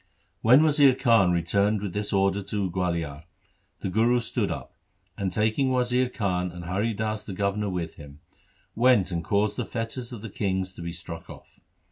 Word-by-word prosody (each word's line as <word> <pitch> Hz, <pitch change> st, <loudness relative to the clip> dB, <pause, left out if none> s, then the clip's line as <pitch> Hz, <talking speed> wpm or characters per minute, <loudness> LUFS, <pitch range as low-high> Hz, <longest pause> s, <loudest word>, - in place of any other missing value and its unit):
When 125 Hz, +7 st, +6 dB
Wazir 145 Hz, -4 st, +5 dB
Khan 115 Hz, -8 st, +4 dB
returned 100 Hz, +5 st, +1 dB
with 100 Hz, -3 st, -5 dB
this 105 Hz, 0 st, -2 dB
order 100 Hz, 0 st, +2 dB
to 100 Hz, -2 st, -2 dB
Gualiar, 85 Hz, -4 st, -2 dB, 0.6 s
the -, -, -2 dB
Guru 115 Hz, +4 st, +3 dB
stood 115 Hz, -, -2 dB
up, -, -, -6 dB, 0.4 s
and 95 Hz, -2 st, -2 dB
taking 110 Hz, +7 st, +1 dB
Wazir 125 Hz, 0 st, +2 dB
Khan 90 Hz, -6 st, -1 dB
and 85 Hz, 0 st, -8 dB
Hari 100 Hz, +5 st, -1 dB
Das 110 Hz, 0 st, -2 dB
the 100 Hz, -, -7 dB
governor 100 Hz, +2 st, -1 dB
with 85 Hz, -3 st, -4 dB
him, 70 Hz, -1 st, -12 dB, 0.5 s
went 115 Hz, -6 st, +3 dB
and 85 Hz, -1 st, -2 dB
caused 100 Hz, +4 st, 0 dB
the -, -, -1 dB
fetters 115 Hz, +1 st, -4 dB
of 115 Hz, -3 st, -8 dB
the 115 Hz, -, -5 dB
kings 95 Hz, -2 st, -2 dB
to -, -, -10 dB
be 85 Hz, 0 st, -4 dB
struck 85 Hz, -1 st, -8 dB
off. -, -, -14 dB
100 Hz, 180 wpm, -26 LUFS, 90-115 Hz, 0.6 s, When